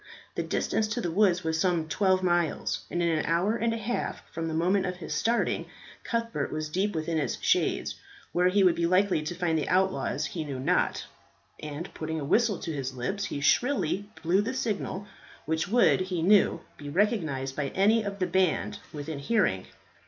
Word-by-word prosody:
The - - -2
distance 215 - 0
to 230 +3 -2
the 175 -7 -2
woods 180 -1 +3
was 160 0 -1
some 175 -4 +1
twelve 185 +3 +2
miles, 175 -3 0
and 175 - -1
in 170 - +2
an - - -2
hour 175 +7 +2
and 230 0 0
a 230 - -1
half 230 +2 -3
from 165 0 -3
the 160 - -3
moment 185 +4 +2
of 180 - -3
his 175 - -5
starting 235 +1 0 0.4
Cuthbert 230 - -2
was 155 0 -3
deep 190 +4 -1
within 160 0 -1
its 145 - -2
shades. - - +1 0.3
Where 180 +1 +3
he 195 +2 +3
would 180 -2 +6
be 170 0 0
likely 185 -2 +3
to 155 +3 -4
find 165 -3 0
the - - -3
outlaws 180 -6 +1
he 160 +3 -4
knew 140 -3 -5
not; 130 - +1 0.5
and, 150 +3 -6
putting 160 0 -4
a 145 - -4
whistle 215 +5 +2
to 165 - -5
his 135 -2 -4
lips, 195 +12 -2
he 145 - -4
shrilly 205 - +1
blew 180 +4 +3
the 240 +5 -3
signal, 205 -5 -2 0.4
which 160 +2 -1
would, 235 +1 +4
he 185 -3 -2
knew, 195 -3 +4 0.2
be 145 - -7
recognized 155 - 0
by 145 -2 -1
any 215 +4 +4
of 200 -1 -4
the 185 - 0
band 180 -1 +1
within 150 0 -5
hearing. 140 - +1
175 Hz, 195 wpm, -28 LUFS, 155-200 Hz, 0.5 s, would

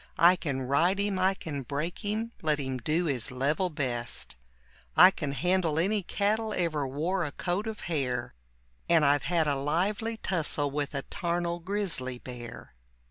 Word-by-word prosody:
I 175 +2 +7
can 140 -7 -3
ride 165 +9 +2
him, 200 -2 0
I 190 +1 +3
can 145 -6 -5
break 145 +6 -3
him, 220 +2 -2
let 155 -2 +1
him 130 -2 -3
do 155 +8 0
his 130 -7 -1
level 145 +8 0
best; 125 - -4 0.6
I 185 - +10
can 145 -7 -3
handle 175 0 +1
any 200 +5 +2
cattle 215 +4 0
ever 155 -5 0
wore 165 +8 -1
a 150 - -3
coat 180 +8 -2
of 220 -1 -5
hair, 130 -7 -2 0.6
And 165 -3 +5
I've 140 0 +4
had 165 -3 +2
a 145 - +2
lively 195 +11 0
tussle 155 -8 0
with 145 0 -2
a 135 - -2
tarnel 175 0 -2
grizzly 170 -9 -2
bear. 120 - -9
165 Hz, 165 wpm, -29 LUFS, 140-185 Hz, 0.6 s, I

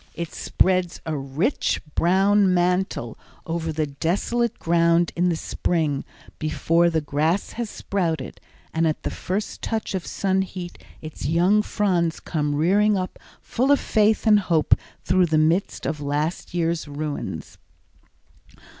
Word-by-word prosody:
It 170 -1 -5
spreads 185 -2 +1
a 160 -1 -2
rich 145 - -1
brown 195 +2 +3
mantle 180 - 0 0.3
over 165 -1 -2
the 155 0 -1
desolate 195 +11 -1
ground 170 0 +2
in 180 +1 +2
the 170 - +1
spring 160 -3 -1 0.4
before 165 +2 +2
the 160 -1 0
grass 155 +6 0
has 235 -2 -4
sprouted, 165 -11 -3 0.3
and 165 0 +2
at 155 - -2
the - - -2
first 200 +4 -4
touch 220 -2 -2
of 185 -2 -3
sun 190 -1 0
heat 180 -2 -6 0.2
its 155 0 -6
young 180 +7 +3
fronds 180 -6 0
come 150 -3 -2
rearing 200 +7 +3
up 185 0 -4 0.2
full 260 +4 -1
of 285 - +5
faith 215 +1 +2
and 210 -2 +6
hope 170 -5 +2 0.3
through 180 0 +3
the 155 -1 +2
midst 165 +5 +1
of 155 -2 -2
the 145 - -6
last 150 +4 -2
year's 165 -2 0
ruins. 145 0 -5
170 Hz, 145 wpm, -23 LUFS, 155-190 Hz, 0.4 s, and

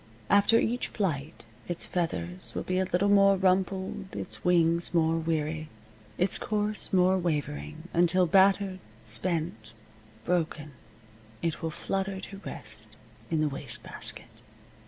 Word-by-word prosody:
After 205 +3 +6
each 240 +2 0
flight 155 - -3 0.2
its 175 -1 -1
feathers 175 +1 -3
will - - -2
be 185 0 0
a 190 - +2
little 185 +3 +3
more 195 -1 +6
rumpled, 190 0 0
its - - -5
wings 170 -1 +3
more 165 -1 +3
weary, 155 -1 -1 0.5
its 185 +1 +1
course 210 0 -1
more 185 0 +4
wavering, 145 - -3
until, 175 +2 +4
battered, 190 +1 +4 0.2
spent, 115 -2 -1 0.5
broken, 155 -4 -1 0.7
it 165 -2 -1
will 165 - -1
flutter 195 +4 -2
to 195 +1 -8
rest 110 0 -8 0.3
in 160 -2 +1
the 155 - +3
waste 135 -2 -7
basket. - - -9
175 Hz, 130 wpm, -29 LUFS, 155-190 Hz, 0.7 s, After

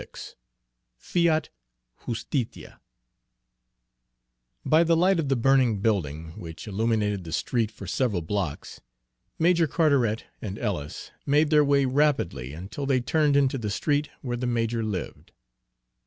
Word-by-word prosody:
XXXVI - - -10 0.6
FIAT 165 - +1 0.6
JUSTITIA 120 +1 -4 1.9
By 160 +2 +5
the 165 0 +3
light 185 +1 +3
of 145 -4 -1
the 135 - +3
burning 125 -3 +3
building, 80 -7 -1
which 80 +3 -9
illuminated 105 -2 0
the 80 - -8
street 115 +6 0
for 105 -3 -11
several 100 -2 -1
blocks, 90 -3 -4 0.6
Major 170 0 +3
Carteret 140 - +2 0.2
and 100 -1 -5
Ellis 90 -11 -4 0.2
made 150 +2 +3
their 150 -1 +6
way 140 -1 +3
rapidly 130 - +1
until 95 - -6
they 135 -2 +3
turned 145 +3 +2
into 135 -1 +2
the 105 -3 -3
street 145 +7 0
where 120 -2 -3
the 125 +1 -2
major 115 -1 0
lived. 105 -5 -5
120 Hz, 130 wpm, -26 LUFS, 105-145 Hz, 1.9 s, their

